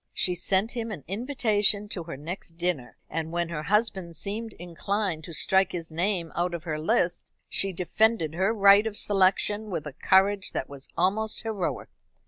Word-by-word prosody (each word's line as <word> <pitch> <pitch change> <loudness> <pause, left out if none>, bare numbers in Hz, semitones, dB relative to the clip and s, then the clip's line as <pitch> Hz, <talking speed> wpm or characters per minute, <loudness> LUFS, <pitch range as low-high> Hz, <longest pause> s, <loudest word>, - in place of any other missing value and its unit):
She 180 - +2
sent 195 +5 +1
him 230 -2 -4
an 180 -10 -6
invitation 210 - +2
to 175 -5 -5
her 165 -4 -7
next 165 +2 -8
dinner, 170 -8 -2
and 160 0 -4
when 170 0 -1
her 160 -3 -3
husband 190 -1 0
seemed 215 +6 -3
inclined 175 0 -3
to - - -9
strike 190 +4 +2
his 165 -2 -4
name 175 0 -1
out 175 0 0
of 165 - -7
her 155 -3 -3
list, 170 +2 0 0.2
she 195 - +2
defended 180 -1 +1
her 190 +5 +1
right 200 0 +6
of 210 -1 -5
selection 205 +2 +2
with 170 -6 -3
a 150 - -6
courage 195 +5 +2
that - - -2
was 140 -1 -11
almost 210 +6 0
heroic. 215 -6 -3
190 Hz, 175 wpm, -27 LUFS, 170-205 Hz, 0.2 s, right